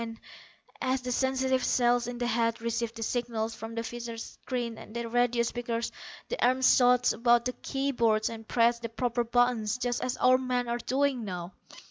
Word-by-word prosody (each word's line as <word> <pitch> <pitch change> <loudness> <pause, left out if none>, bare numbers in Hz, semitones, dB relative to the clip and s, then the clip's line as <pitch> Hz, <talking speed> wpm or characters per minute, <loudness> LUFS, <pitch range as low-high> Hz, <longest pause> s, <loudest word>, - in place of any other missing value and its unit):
And, 225 -1 -6 0.6
as 260 0 0
the 250 0 -4
sensitive 260 0 +1
cells 240 -1 +2
in 245 0 -5
the 245 - -2
head 230 -1 +1
received 235 0 -2
the 225 - -4
signals 230 -1 -2
from 225 0 -8
the 230 - -2
visor 235 0 -6
screens 235 0 -5
and 220 - -12
the 235 0 -3
radio 245 0 +2
speakers 235 -1 -2 0.4
the - - -2
arms 255 +1 +5
shot 250 -1 +4
about 235 +1 +3
the 250 - -1
key 275 +1 -1
boards 220 -4 +2
and 225 -1 -7
pressed 235 0 +2
the 230 - -4
proper 240 +1 -1
buttons 240 -2 +1
just 245 -1 -2
as 255 - -2
our 255 +1 +5
men 250 -1 -1
are 235 0 -1
doing 265 0 0
now. 180 -2 -6
240 Hz, 190 wpm, -29 LUFS, 230-250 Hz, 0.6 s, arms